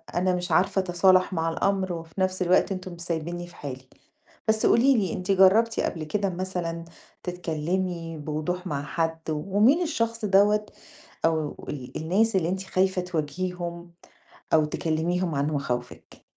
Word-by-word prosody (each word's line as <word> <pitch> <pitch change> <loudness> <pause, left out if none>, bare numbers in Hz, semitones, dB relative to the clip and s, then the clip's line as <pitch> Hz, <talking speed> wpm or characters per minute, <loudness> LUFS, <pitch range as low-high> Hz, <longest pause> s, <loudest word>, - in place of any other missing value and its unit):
أنا 185 +1 +2
مش 180 0 -4
عارفة 190 +4 +3
أتصالَح 185 +1 +3
مع 165 -1 0
الأمر، 190 +2 0
وفي 165 +2 -6
نفس 185 0 0
الوقت 185 +2 +3
أنتم 185 -1 -5
مش 170 - -11
سايبينّي 175 +1 -3
في 175 - -16
حالي. 130 -2 -8 0.6
بس 220 0 +2
قولي 260 +3 +5
لي 190 -6 0
أنتِ 185 +2 -2
جرّبتِ 200 +4 +5
قبل 160 -2 -1
كده 200 +5 -1
مثلًا 175 -2 -3 0.4
تتكلّمي 175 0 -3
بوضوح 155 +5 -3
مع 145 -4 -2
حد، 160 +2 -1
ومين 205 - +3
الشخص 230 -9 -1
دَوّة 210 +2 +4 0.6
أو 160 -2 -1
ال 130 -4 -6
الناس 195 +7 +1
اللي 170 -3 +2
أنتِ 190 +1 -2
خايفة 190 -1 +1
تواجهيهم 175 +1 -4 0.6
أو 155 -1 +5
تكلميهم 165 +2 -1
عن 140 +1 +1
مخاوفِك؟ 125 -4 -4
180 Hz, 145 wpm, -26 LUFS, 160-190 Hz, 0.6 s, قولي